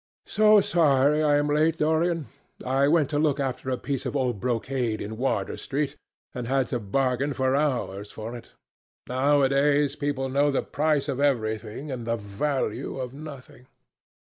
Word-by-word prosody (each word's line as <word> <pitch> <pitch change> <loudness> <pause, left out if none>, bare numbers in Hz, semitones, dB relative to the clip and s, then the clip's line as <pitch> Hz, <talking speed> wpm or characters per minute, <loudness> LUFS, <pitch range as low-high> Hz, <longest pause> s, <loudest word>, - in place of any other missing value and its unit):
"So 215 -1 +5
sorry 150 -4 +3
I 150 -1 +3
am 145 - +1
late, 155 +2 +2
Dorian. 160 +1 +1 0.4
I 135 +2 +2
went 155 -1 +3
to 145 - +1
look 150 -2 +1
after 130 -1 -3
a 130 - 0
piece 135 -1 -3
of 140 - -4
old 125 -6 0
brocade 120 -1 -1
in 105 +2 -5
Wardour 110 -5 -1
Street 140 +1 -3 0.4
and 125 -2 -5
had 135 0 +1
to 125 - -1
bargain 130 +6 0
for 130 0 +1
hours 120 -9 -1
for 110 +2 -7
it. 120 - -12 0.5
Nowadays 140 +2 +2
people 145 -2 -2
know 140 +2 +2
the 135 - 0
price 150 0 0
of 130 - -2
everything 115 0 -1
and 120 -3 -5
the 115 - +1
value 110 +5 -3
of 130 -1 -5
nothing." 140 -4 -11
135 Hz, 165 wpm, -26 LUFS, 125-145 Hz, 0.5 s, So